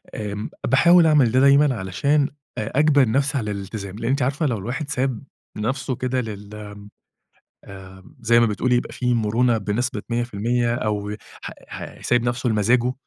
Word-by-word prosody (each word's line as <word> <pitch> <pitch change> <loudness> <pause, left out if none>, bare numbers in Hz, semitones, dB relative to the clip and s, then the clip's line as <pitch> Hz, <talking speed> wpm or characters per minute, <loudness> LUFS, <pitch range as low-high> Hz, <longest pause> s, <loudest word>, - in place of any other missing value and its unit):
آمم 105 0 -4 0.2
باحاول 170 +7 +5
أعمل 145 -7 +4
ده 130 - +3
دايمًا، 140 0 +5
علشان 140 +10 0 0.3
أ 110 +6 -2
أجبِر 145 -5 +4
نفسي 140 +4 +1
على 105 -5 -2
الالتزام، 100 -1 -6
لإن 115 - -2
أنتِ 135 0 +1
عارفة 140 +5 0
لو 120 -6 0
الواحد 125 +9 -5
ساب 130 -4 -2 0.3
نفسه 125 +4 -2
كده 130 +1 -1
لل 105 -1 -8
آمم 105 -1 -10 1.3
زي 115 +1 +4
ما 115 - +4
بتقولي 120 +4 +1
يبقى 120 - -3
في 125 -1 0
مُرونة 115 +1 +2
بنسبة 120 +6 -2
100% 120 +1 0
أو 105 -3 -2 0.3
ح - - -6 0.2
ح - - -9
سايب 120 -1 +2
نفسُه 120 +1 -1
لمزاجُه، 120 +3 +2
120 Hz, 160 wpm, -22 LUFS, 105-130 Hz, 1.3 s, باحاول